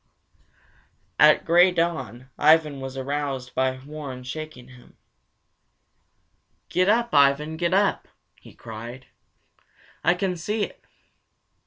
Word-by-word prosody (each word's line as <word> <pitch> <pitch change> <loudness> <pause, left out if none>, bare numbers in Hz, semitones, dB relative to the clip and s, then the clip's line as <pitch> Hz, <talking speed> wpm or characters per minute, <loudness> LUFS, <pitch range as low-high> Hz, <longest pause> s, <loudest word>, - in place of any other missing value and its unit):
At 150 +1 +6
gray 175 +2 +6
dawn 135 - -3
Ivan 155 -2 +3
was 135 0 -7
aroused 135 -1 -4
by 130 0 0
Warren 145 -4 -8
shaking 130 -2 -8
him. 125 -1 -18 1.7
"Get 185 +2 +2
up, 235 +2 +1
Ivan, 145 +2 +3
get 170 +2 -1
up!" 200 0 +1 0.3
he - - -16
cried. 120 +3 -9 1.0
"I 175 - +3
can 180 0 -2
see 210 +6 -2
it!" - - -7
150 Hz, 110 wpm, -24 LUFS, 130-170 Hz, 1.7 s, At